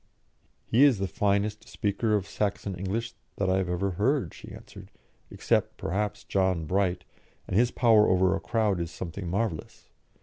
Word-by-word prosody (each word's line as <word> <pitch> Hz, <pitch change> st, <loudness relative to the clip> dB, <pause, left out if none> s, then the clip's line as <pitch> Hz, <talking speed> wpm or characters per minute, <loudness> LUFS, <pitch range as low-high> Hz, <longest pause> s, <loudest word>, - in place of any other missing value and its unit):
"He 120 Hz, +5 st, +4 dB
is 140 Hz, -6 st, +5 dB
the 95 Hz, -, -1 dB
finest 100 Hz, +3 st, -1 dB
speaker 105 Hz, +2 st, 0 dB
of 100 Hz, -3 st, -1 dB
Saxon 100 Hz, -1 st, -2 dB
English 95 Hz, +6 st, -3 dB, 0.2 s
that 95 Hz, -2 st, 0 dB
I 95 Hz, -, +2 dB
have 95 Hz, -2 st, -1 dB
ever 90 Hz, +2 st, -1 dB
heard," 120 Hz, -, 0 dB
she -, -, -11 dB
answered, -, -, -12 dB, 0.4 s
"except, -, -, 0 dB
perhaps, 105 Hz, +4 st, -2 dB
John 95 Hz, -4 st, 0 dB
Bright, 90 Hz, 0 st, 0 dB, 0.4 s
and -, -, -3 dB
his 120 Hz, +4 st, +4 dB
power 115 Hz, -4 st, +4 dB
over 95 Hz, 0 st, +3 dB
a -, -, -3 dB
crowd 110 Hz, -5 st, 0 dB
is 85 Hz, -1 st, -3 dB
something 90 Hz, +2 st, -6 dB
marvellous. 100 Hz, -3 st, -3 dB
100 Hz, 165 wpm, -27 LUFS, 95-110 Hz, 0.4 s, is